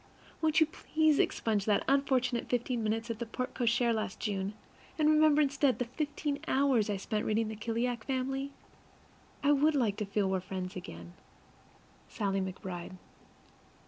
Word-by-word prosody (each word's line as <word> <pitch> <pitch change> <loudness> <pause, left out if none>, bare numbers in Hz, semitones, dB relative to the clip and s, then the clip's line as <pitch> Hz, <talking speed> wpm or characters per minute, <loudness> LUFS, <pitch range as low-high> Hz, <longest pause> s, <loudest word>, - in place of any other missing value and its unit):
Won't 315 0 +3
you 315 - +6
please 310 -1 +1
expunge 210 -3 +1
that 210 -2 +2
unfortunate 260 -3 +1
fifteen 245 0 0
minutes 225 +2 -1
at 225 - -6
the 235 - -2
porte 255 +3 -4
cochere 240 -1 +2
last 215 -3 -3
June, 200 -1 -2 0.4
and 305 -1 +3
remember 305 -1 +5
instead 280 -1 +2
the 245 - -1
fifteen 290 +2 -3
hours 265 -6 +3
I 205 - 0
spent 210 +2 -2
reading 220 0 0
the 220 - -5
Kallikak 230 +2 -2
Family? 270 +1 -2 0.9
I 285 - +4
would 295 +2 +4
like 220 -7 +1
to 210 - -2
feel 200 0 0
that - - -1
we're 190 - +1
friends 185 0 -5
again. 85 - -8 1.0
SALLIE 195 -2 -1
McBRIDE. 185 -1 -6
235 Hz, 160 wpm, -31 LUFS, 205-275 Hz, 1.0 s, you